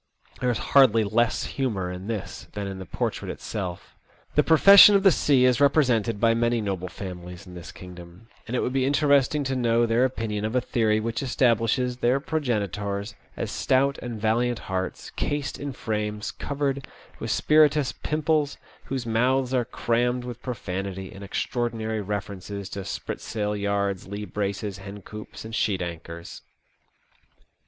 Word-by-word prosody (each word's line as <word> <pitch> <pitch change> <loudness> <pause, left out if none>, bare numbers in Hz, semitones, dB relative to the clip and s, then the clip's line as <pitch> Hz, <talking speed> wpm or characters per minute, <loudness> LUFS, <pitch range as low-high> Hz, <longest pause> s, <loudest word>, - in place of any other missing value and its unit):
There 125 - +1
is 120 - +1 0.2
hardly 115 -5 +6
less 110 +3 +1
humour 105 -10 -2
in 90 +2 -7
this 110 -4 -5
than 105 -1 -4
in 95 -1 -5
the 95 - -8
portrait - - -3
itself. 95 -5 -5 0.4
The 150 - +5
profession 195 +6 +9
of 195 - +3
the 195 - +7
sea 135 -5 +3
is 125 +1 +3
represented 125 -7 +3
by 115 0 +4
many 120 +1 +1
noble 95 -4 -3
families 90 -1 -8
in 90 - -12
this 85 -1 -9
kingdom, 90 +2 -12 0.2
and 120 - -3
it - - +1
would 125 - -1
be 135 -1 +2
interest 140 0 +3
ing 150 - 0
to 135 -1 -1
know 120 -1 +2
their 115 +2 +2
opinion 110 -5 -1
of 110 +3 -2
a - - +5
theory 110 -3 +1
which 115 +1 -2
establishes 125 -1 +1
their 125 +2 +2
progenitors 105 - -2 0.2
as - - -3
stout 135 +1 +1
and 120 -3 -6
valiant 120 +3 +1
hearts, 95 -2 -4
cased 145 -1 -3
in 145 -1 -4
frames 105 -3 -3
covered 140 -1 -3 0.3
with - - -4
spirituous 150 -2 +4
pimples, 155 -1 0 0.3
whose 130 -2 -3
mouths 125 +3 +1
are 125 -2 +2
crammed 120 +1 0
with 120 -1 -7
profanity 95 -5 -5
and 95 +1 -10
extraordinary 110 +1 -2
references 100 -1 -5
to 100 0 -5
spritsail 105 +2 -3
yards, 100 -2 -1
lee 100 +1 -5
braces, 100 0 -3
hencoops, 105 +2 -9
and 110 - -8
sheet 100 -5 0
anchors. 85 0 -8
115 Hz, 160 wpm, -25 LUFS, 100-130 Hz, 0.4 s, profession